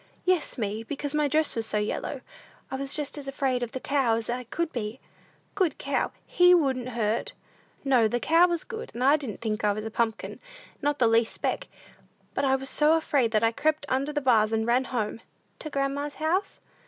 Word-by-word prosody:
"Yes, 365 -6 +1
me, 215 -1 -2
because 290 +3 -4
my 300 -1 +2
dress 310 +1 +1
was 225 -1 -3
so 210 - -1
yellow. 210 0 -2 0.5
I - - -2
was 275 0 -1
just 295 -1 -1
as 275 - -8
afraid 270 -2 0
of 240 -1 -3
the 260 - -4
cow 265 -4 +1
as 230 +1 -3
I 250 +1 -3
could 335 +7 -2
be." 225 +1 -4 0.5
"Good 370 -7 +1
cow! 280 - -1
He 360 0 +6
wouldn't 260 -6 +1
hurt!" 220 0 0 0.5
"No, 250 -5 +4
the 240 +3 -1
cow 330 +7 +5
was 345 -2 -1
good, 455 -2 -7
and 270 +5 +4
didn't 235 -7 -5
think 215 -2 -2
I 205 -1 +3
was 215 +1 -5
a 220 - -4
pumpkin, 225 0 -2 0.4
not 290 0 +1
the 250 - +3
least 225 0 +3
speck. - - -2 0.7
But 275 - 0
I 265 0 +3
was 270 0 -4
so 305 +2 +4
afraid, 280 -7 +1
that 220 0 +1
I 225 - +4
crept 305 +4 0
under 270 +3 0
the 295 0 -1
bars, 225 -5 +4
and 220 0 0
ran 245 +3 +2
home." 225 -4 -2 0.4
"To 310 - -6
grandma's 280 +1 -2
house?" 355 +6 -1
265 Hz, 205 wpm, -27 LUFS, 230-300 Hz, 0.7 s, He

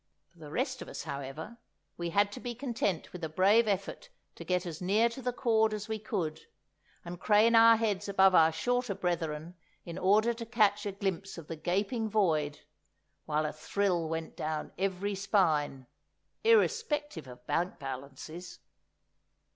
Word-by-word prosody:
For 170 - -24
the 150 -2 -10
rest 260 - -2
of - - -7
us, - - -6
however, 140 - -6 0.4
we 170 0 -3
had 200 +4 +2
to 250 - -7
be 245 -1 -5
content 230 - -2
with 180 -2 -8
a 160 - -2
brave 200 +7 +4
effort 200 - -2 0.2
to - - -9
get 180 0 0
as 170 -1 -6
near 210 +6 +3
to 235 +3 -8
the 250 0 -1
cord 220 -3 +2
as 210 +1 -6
we 220 -1 -3
could, 160 -6 -3 0.6
and 175 0 -7
crane 215 +2 +4
our 230 0 +8
heads 210 -3 -1
above 195 -1 +5
our 160 -2 +6
shorter 245 +6 -1
brethren 165 -2 -2 0.3
in 170 -1 -6
order 215 +5 +4
to 230 0 -7
catch 210 -2 +2
a - - -2
glimpse 195 -1 -3
of 165 - -8
the 165 - -5
gaping 200 +8 -1
void, 155 -8 +1 0.7
while 155 0 +1
a 150 - -3
thrill 175 0 -1
went 160 0 -4
down 155 0 -3
every 195 +1 -1
spine, 160 -9 +1 0.6
irrespective 320 - +2
of 125 0 -12
bank 175 +7 -1
balances. 140 +5 -8
195 Hz, 165 wpm, -31 LUFS, 160-220 Hz, 0.7 s, our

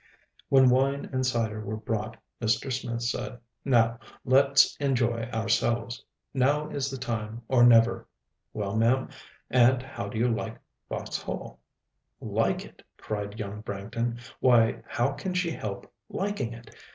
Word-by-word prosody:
When 130 -2 +6
wine 135 +2 +2
and 130 0 +1
cyder 115 -4 -1
were 110 +1 -4
brought, 110 0 -3 0.2
Mr. 115 +3 +1
Smith 120 -2 -3
said, 120 +1 -3 0.3
"Now 115 -3 +3 0.3
let's 140 +1 +5
enjoy 120 -5 +1
ourselves; 115 +1 0 0.3
now 145 +3 +2
is 140 -2 -2
the 135 - -5
time, 115 -2 -4
or 125 -2 +4
never. 115 -1 +5 0.4
Well, 100 -1 -3
ma'am, 120 +4 +2 0.4
and 125 0 +5
how 130 0 -6
do 110 - -6
you 120 +2 +3
like - - -4 0.3
Vauxhall?" - - -5 0.6
"Like - - 0
it!" - - -16 0.2
cried 105 0 -5
young 105 0 -5
Branghton; 115 +3 -3 0.2
"why, 120 -3 +4
how 120 +4 0
can 180 +6 -4
she 180 -2 +1
help 100 -9 -5 0.2
liking 195 - -2
it? 115 -1 -13
120 Hz, 140 wpm, -28 LUFS, 115-130 Hz, 0.6 s, When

